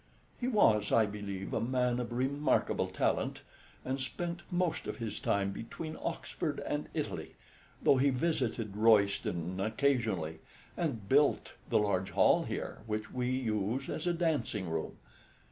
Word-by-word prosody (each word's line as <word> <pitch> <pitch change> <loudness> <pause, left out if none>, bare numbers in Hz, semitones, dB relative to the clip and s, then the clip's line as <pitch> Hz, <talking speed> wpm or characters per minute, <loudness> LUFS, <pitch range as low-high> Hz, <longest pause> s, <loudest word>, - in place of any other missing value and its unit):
He 245 - -1
was, 110 - +4
I 115 - +5
believe, 100 -2 -5
a - - +1
man 125 0 +1
of 120 -1 -3
remarkable 135 +4 +1
talent, - - 0 0.4
and 130 +1 -2
spent 170 +5 -3
most 175 -2 0
of - - -4
his 115 -3 -4
time 100 -1 +1
between 155 +10 -6
Oxford - - -3
and - - -2
Italy, - - -3 0.5
though 135 - +6
he 140 +2 +4
visited 125 -7 -1
Royston 100 -5 +3
occasionally, 110 - 0 0.4
and 125 - -2
built 145 +4 +3 0.2
the - - +4
large 100 -3 +1
hall - - +4
here, - - -4
which 105 0 -3
we 125 -1 -1
use 120 0 -1
as 160 - -3
a 175 - +3
dancing 150 - 0
room. 80 -1 -3
115 Hz, 145 wpm, -32 LUFS, 105-140 Hz, 0.5 s, though